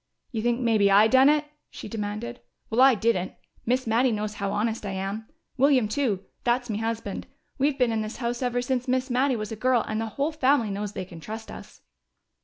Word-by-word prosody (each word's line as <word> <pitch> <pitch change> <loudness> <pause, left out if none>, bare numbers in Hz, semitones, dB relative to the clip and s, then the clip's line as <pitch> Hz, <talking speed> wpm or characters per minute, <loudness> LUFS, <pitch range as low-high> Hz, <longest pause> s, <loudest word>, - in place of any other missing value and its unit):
"You 225 -4 -2
think 240 +1 +1
maybe 220 -5 +3
I 200 +2 +7
done 260 +4 +6
it?" 300 0 +2 0.2
she - - -9
demanded. 205 - -5 0.3
"Well, 230 +3 +3
I 265 -1 +7
didn't! 215 -4 0 0.3
Miss 255 +2 +1
Mattie 235 +3 +2
knows 215 -1 -2
how 200 0 -1
honest 220 +1 -1
I 200 -2 -4
am. 195 +3 -4 0.3
William 265 -4 +4
too 215 -5 -1 0.2
that's 245 0 0
me 210 - -2
husband. 225 -3 -3 0.3
We've 280 +1 +2
been 250 -3 +2
in 220 -1 0
this 215 +1 -5
house 240 0 -3
ever 245 -1 0
since 255 0 -1
Miss 255 +1 0
Mattie 260 +1 +2
was 215 -1 -4
a - - -3
girl, 245 +1 +2
and 215 0 -2
the 225 - -2
whole 285 +3 +1
family 270 -7 +2
knows 205 +1 -4
they 190 - -4
can 175 -2 -11
trust 220 +7 -7
us." - - -12
230 Hz, 210 wpm, -26 LUFS, 210-255 Hz, 0.3 s, I